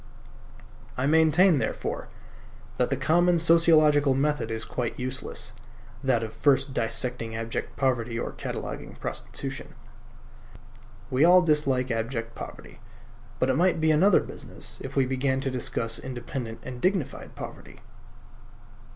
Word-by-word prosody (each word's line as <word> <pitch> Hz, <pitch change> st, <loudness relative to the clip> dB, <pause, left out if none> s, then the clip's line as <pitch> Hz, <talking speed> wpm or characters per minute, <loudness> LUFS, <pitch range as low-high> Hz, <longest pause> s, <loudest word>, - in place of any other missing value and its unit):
I 130 Hz, -, 0 dB
maintain, 160 Hz, +2 st, +5 dB
therefore, -, -, -3 dB, 0.7 s
that -, -, +1 dB
the -, -, 0 dB
common 175 Hz, +2 st, +3 dB
sociological 155 Hz, -4 st, +5 dB
method 145 Hz, -3 st, 0 dB
is 115 Hz, 0 st, -3 dB
quite 120 Hz, -2 st, -3 dB
useless: 130 Hz, 0 st, -5 dB, 0.5 s
that 125 Hz, -4 st, +2 dB
of 110 Hz, -, -6 dB
first 140 Hz, -1 st, +2 dB
dissecting 115 Hz, 0 st, -1 dB
abject 115 Hz, 0 st, -4 dB
poverty 120 Hz, -4 st, 0 dB
or -, -, -3 dB
cataloguing -, -, -6 dB
prostitution. -, -, -6 dB, 1.4 s
We 130 Hz, +3 st, +3 dB
all 180 Hz, +2 st, +7 dB
dislike 135 Hz, -6 st, +1 dB
abject 115 Hz, 0 st, -3 dB
poverty; -, -, -10 dB, 0.6 s
but 130 Hz, +2 st, +2 dB
it -, -, 0 dB
might 170 Hz, +2 st, +2 dB
be 160 Hz, 0 st, +3 dB
another 185 Hz, +6 st, +5 dB
business -, -, -9 dB
if 135 Hz, +1 st, -7 dB
we 135 Hz, -2 st, +3 dB
began 130 Hz, +1 st, 0 dB
to 135 Hz, -, -2 dB
discuss 115 Hz, -2 st, 0 dB
independent 120 Hz, -2 st, -6 dB
and 125 Hz, -1 st, -7 dB
dignified 185 Hz, -4 st, -1 dB
poverty. -, -, -9 dB
135 Hz, 125 wpm, -26 LUFS, 120-155 Hz, 1.4 s, all